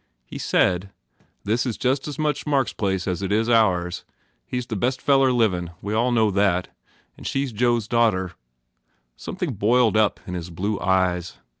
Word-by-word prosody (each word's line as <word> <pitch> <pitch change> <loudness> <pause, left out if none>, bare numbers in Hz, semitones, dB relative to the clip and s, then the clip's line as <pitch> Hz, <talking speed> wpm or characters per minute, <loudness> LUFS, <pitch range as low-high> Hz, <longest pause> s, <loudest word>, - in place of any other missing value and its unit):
He - - -8
said, 90 +1 +1 0.5
"This 110 +4 0
is 125 -4 -3
just 130 +3 0
as 150 - -6
much 150 -1 -1
Mark 140 -4 +2
s - - -9
place 95 -3 -1
as 90 0 -2
it 100 0 -3
is 110 +2 +2
ours. 90 -7 +2 0.4
He 125 - -3
s 125 - -3
the 115 - -5
best 125 +6 0
feller 135 -1 +3
livin. 95 -8 +1
We 105 +2 -4
all 120 +3 +2
know 110 -3 +3
that. 95 -2 +1 0.5
And - - -7
she 135 - 0
s 135 - -4
Joe 120 +2 +2
s 110 -2 -5
daughter." 110 -6 +1 0.8
Something - - -4
boiled 115 +1 +2
up 110 -1 +2
in 90 - -6
his 90 -1 -5
blue 100 +4 -2
eyes. 90 -2 0
110 Hz, 190 wpm, -23 LUFS, 95-125 Hz, 0.8 s, feller